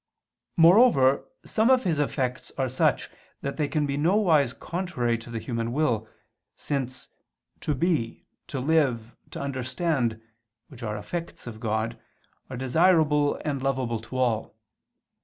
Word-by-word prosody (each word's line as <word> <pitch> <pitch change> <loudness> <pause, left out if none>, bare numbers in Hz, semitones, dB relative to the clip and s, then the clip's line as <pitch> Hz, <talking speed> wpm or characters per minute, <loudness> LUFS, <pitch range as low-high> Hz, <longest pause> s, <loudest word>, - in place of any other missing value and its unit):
Moreover 165 - +6 0.2
some 220 +2 +2
of 260 -1 +5
His 165 -5 0
effects 130 -3 -2
are 135 -1 +1
such 130 +1 +1 0.3
that 140 - -4
they 150 -2 +1
can 150 0 0
nowise 155 - +3
be 140 - -18
contrary 170 -10 -1
to 115 - -12
the 115 - -4
human 115 0 -3
will, 120 -7 0 0.5
since 130 -3 -4 0.5
to 150 - -1
be, 140 -6 -1 0.2
to 135 - -4
live, 130 -6 +1
to - - -7
understand, 130 -2 -1 0.5
which 130 -3 -13
are 105 -2 -3
effects 170 +11 -6
of 115 -3 -8
God, 110 0 -2 0.5
are 130 - -6
desirable 150 +2 +3
and 140 -3 -1
lovable 130 -4 -1
to 115 +4 -7
all. 115 -5 0
135 Hz, 140 wpm, -26 LUFS, 120-160 Hz, 0.5 s, Moreover